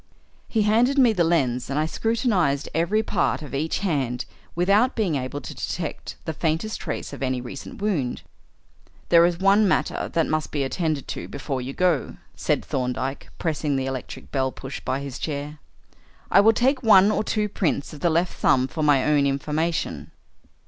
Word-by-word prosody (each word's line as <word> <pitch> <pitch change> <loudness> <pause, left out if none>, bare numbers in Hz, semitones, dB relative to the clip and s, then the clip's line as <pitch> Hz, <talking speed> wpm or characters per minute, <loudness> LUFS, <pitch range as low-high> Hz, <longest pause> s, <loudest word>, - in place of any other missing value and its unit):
He 220 -2 +1
handed 235 +6 +3
me 250 -4 +5
the 180 -4 +2
lens 130 -8 +1
and 140 - -2
I 155 - +2
scrutinised 185 - 0
every 180 +7 +1
part 190 -6 0
of 145 - -9
each 155 +4 -1
hand 135 -10 -1 0.3
without 200 +9 +3
being 205 -8 0
able 140 +1 -3
to - - -7
detect - - -5
the 160 - -2
faintest 165 +7 -2
trace 155 - -4
of - - -8
any 130 -1 0
recent 140 - -8
wound. 155 -13 -1 0.9
"There 170 -1 +7
is 175 -1 -2
one 195 +3 +4
other 215 - +4
matter - - 0
that 165 -1 +2
must 155 0 -1
be 145 -2 -1
attended 155 0 -2
to - - -5
before 135 -2 -4
you 130 +2 -5
go," 175 -4 0 0.2
said - - -1
Thorndyke, 130 +1 -3
pressing 155 -3 -1
the 135 -1 -1
electric 130 -2 -6
bell 130 -1 0
push 135 +1 -7
by 130 +2 -2
his 140 -2 -6
chair. 150 0 -4 0.7
"I 195 - +7
will 220 +2 +6
take 255 +4 +2
one 210 -4 +6
or 215 - 0
two 210 -1 0
prints 175 -8 -1
of 150 - -9
the 170 - +2
left 170 +2 +1
thumb 130 -1 +3
for 155 - -5
my 145 -3 +4
own 145 -2 +3
information." 140 - -2
155 Hz, 185 wpm, -24 LUFS, 135-200 Hz, 0.9 s, There